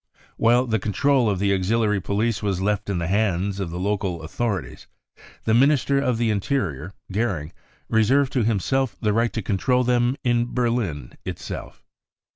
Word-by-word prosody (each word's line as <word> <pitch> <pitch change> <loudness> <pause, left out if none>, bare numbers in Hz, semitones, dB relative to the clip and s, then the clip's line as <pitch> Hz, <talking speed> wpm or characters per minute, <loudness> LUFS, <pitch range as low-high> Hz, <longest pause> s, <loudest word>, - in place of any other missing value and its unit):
While 120 +2 +4
the 110 -3 0
control 120 +5 +2
of 100 - 0
the 100 +1 +1
auxiliary 105 +2 +1
police 105 +4 -1
was 100 -3 -1
left 100 +1 -1
in 100 - 0
the 85 - -2
hands 100 0 0
of 95 -4 -3
the 85 - -5
local 95 -4 -2
authorities, 100 +3 -3 0.6
the 110 - +1
Minister 140 +2 +3
of 125 -4 0
the 115 -1 +1
Interior, 95 - -2 0.2
Goering, 95 -8 -2 0.3
reserved 125 +5 +2
to 125 - +2
himself 115 +5 0
the 105 -2 +1
right 115 +2 +1
to 110 - -3
control 125 +7 +1
them 125 +1 +2
in 120 -1 0
Berlin 115 - -1
itself. - - -7
110 Hz, 160 wpm, -23 LUFS, 95-120 Hz, 0.6 s, While